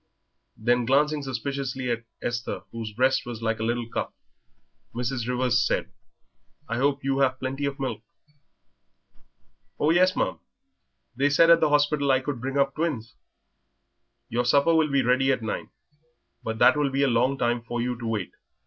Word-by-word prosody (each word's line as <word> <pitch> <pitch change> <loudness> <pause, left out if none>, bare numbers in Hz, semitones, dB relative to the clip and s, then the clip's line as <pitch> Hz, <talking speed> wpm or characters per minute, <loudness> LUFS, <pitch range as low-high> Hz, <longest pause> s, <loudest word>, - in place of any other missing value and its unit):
Then, 120 +2 +1
glancing 145 +4 +2
suspiciously 130 -1 -3
at 115 0 -3 0.2
Esther, 120 0 -3
whose 115 -2 -6
breast 130 +5 +2
was 115 -2 -7
like 115 0 -1
a - - -2
little 120 0 -1
cup, - - -4 0.8
Mrs. 120 0 -2
Rivers 125 -1 +2
said, - - -1 0.8
"I 115 - -2
hope 140 +2 +1
you 135 0 0
have 130 -1 +2
plenty 135 +2 -3
of 140 0 -3
milk?" 135 -4 -3 1.8
"Oh, 150 - +3
yes, 185 +2 +4
ma'am; - - -1 0.8
they 140 +3 +2
said 165 +4 +5
at 165 - +7
the - - +2
hospital 145 -1 +2
I 130 -1 +4
could 130 -2 -5
bring 135 +2 -3
up 140 0 +2
twins." 135 -9 -3 1.1
"Your 120 +2 -1
supper 140 +6 +3
will 160 -2 +3
be 140 -1 +2
ready 130 +2 +3
at 125 -3 -1
nine. 110 - -4 0.7
But 110 0 -4
that - - +6
will 145 -2 +1
be 135 +1 0
a - - +4
long 125 +3 +2
time 120 -1 0
for 120 +1 -5
you 125 +1 -1
to 115 - -5
wait. 105 -5 -2
130 Hz, 170 wpm, -25 LUFS, 120-140 Hz, 1.8 s, at